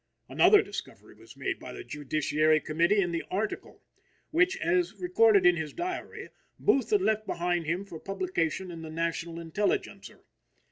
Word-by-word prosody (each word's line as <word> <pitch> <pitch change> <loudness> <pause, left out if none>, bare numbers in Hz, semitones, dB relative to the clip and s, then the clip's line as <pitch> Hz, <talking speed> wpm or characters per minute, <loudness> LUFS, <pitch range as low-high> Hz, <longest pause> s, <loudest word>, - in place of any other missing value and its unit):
Another 415 -1 +5
discovery - - -9
was - - -16
made - - -3
by - - -9
the 390 - -8
Judiciary 155 - +1
Committee 170 +7 +1
in 175 -2 -1
the 170 -1 -2
"Article" 210 +3 -4 0.5
which, 355 +4 +3
as 350 0 0
recorded 225 - +4
in 180 -1 +6
his 160 -2 -4
diary, 360 +1 -5 0.3
Booth 275 -10 +2
had 410 -2 +2
left 215 0 0
behind 175 -1 -1
him 175 +5 -1
for 170 -5 -9
publication 185 -2 -2
in 165 -1 -8
the 160 - -8
National 165 +1 -3
Intelligencer. 170 +5 -3
180 Hz, 155 wpm, -28 LUFS, 165-225 Hz, 0.5 s, in